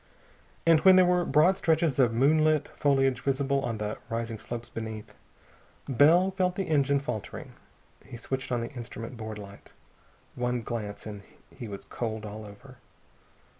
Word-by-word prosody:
And 165 -1 +6
when 190 +3 +7
there 185 -1 +7
were 180 0 +3
broad 175 +7 +4
stretches 160 -4 +1
of 125 -3 +4
moonlit 155 +5 +3
foliage 135 -2 +1
visible 140 0 0
on 115 -4 -3
the 105 0 -4
rising 115 -1 -3
slopes 120 +1 -6
beneath, 110 -2 -7 0.7
Bell 160 +9 +5
felt 185 -1 0
the 195 - -1
engine 140 -4 +2
faltering. 125 -7 -6 0.5
He 120 - -10
switched 130 +2 -4
on 120 -1 0
the 115 - -5
instrument 120 -1 -7
board 110 -1 -6
light. 100 -1 -12 0.6
One 125 0 -1
glance, 105 -3 -5
and 105 -2 -7 0.3
he 120 - -7
was 100 -2 -8
cold 110 -2 -4
all 105 0 -7
over. 125 +6 -14
125 Hz, 155 wpm, -28 LUFS, 110-150 Hz, 0.7 s, when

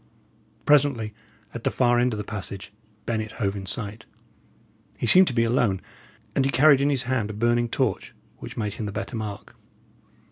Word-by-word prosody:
Presently, 135 -7 +3 0.4
at - - -7
the - - +2
far 120 -1 +2
end 125 +1 +2
of 110 - -3
the 105 - -3
passage, 100 -1 -6 0.3
Bennet 110 -1 -2
hove 100 -3 -1
in 95 -1 -6
sight. 110 +1 -6 0.9
He - - -2
seemed 185 0 +7
to 125 - -1
be 115 - +3
alone, 115 -5 +2 0.6
and 135 - +3
he 135 - +1
carried 135 +2 +5
in 140 - +3
his 135 -4 0
hand 125 -4 -1
a - - -5
burning 120 +2 +1
torch, 120 -5 -1 0.2
which - - -9
made 105 -3 -2
him 105 - -5
the - - -4
better 100 +3 -5
mark. 105 -3 -6
115 Hz, 185 wpm, -25 LUFS, 105-130 Hz, 0.9 s, seemed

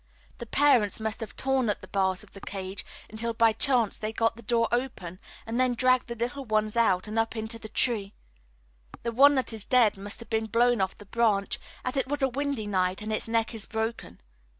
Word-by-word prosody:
The 240 - -7
parents 245 -7 +3
must 220 -1 -3
have 225 - -7
torn 265 -3 +1
at 205 - -1
the - - -11
bars 190 -1 0
of 210 - -18
the 195 - -11
cage 190 0 -5 0.2
until 225 +2 -4
by 225 -1 +4
chance 245 -4 +2
they 215 0 -3
got 225 0 +1
the 235 - -11
door 230 +1 +1
open, 235 -8 -3 0.3
and 230 +2 -2
then 255 -1 +3
dragged 255 +1 +3
the 235 - -5
little 245 +4 -3
ones 215 -2 0
out 215 -5 +2
and 215 +1 -1
up 225 +1 0
into 220 +1 -5
the 220 - -9
tree. 210 -3 -1 0.9
The 235 - -1
one 280 +5 +6
that 260 -3 -1
is 220 -3 -4
dead 235 -5 +3
must 205 +2 -6
have 230 - -11
been 220 0 0
blown 235 0 +3
off 190 - -1
the 205 - -13
branch, 205 -2 +1 0.3
as 255 +2 -2
it 265 - +1
was 290 0 -2
a - - +5
windy 280 -3 -2
night 185 -1 0
and 215 0 -3
its 215 - -2
neck 225 +1 0
is 220 -3 -6
broken. 220 - -4
225 Hz, 220 wpm, -27 LUFS, 210-245 Hz, 0.9 s, one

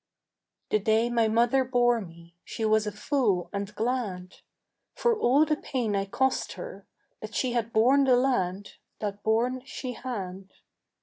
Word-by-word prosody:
The 215 - +3
day 220 +3 +2
my 230 -2 +3
mother 235 +4 +3
bore 240 -2 +2
me 170 -2 -13
She 225 - -4
was 215 0 +2
a - - -1
fool 205 -4 0
and 200 0 -3
glad, 215 -7 -3 0.6
For 480 -2 +2
all 285 - +4
the 305 0 +1
pain 240 -9 -2
I 195 0 0
cost 260 +6 0
her, - - -9 0.3
That - - -8
she 255 - 0
had 235 -2 -1
borne 260 +6 +4
the 255 -2 +5
lad 205 -7 0 0.3
That 205 -1 -4
borne 240 +4 +1
she 260 -2 -6
had. 195 -7 -6
230 Hz, 160 wpm, -27 LUFS, 205-255 Hz, 0.6 s, the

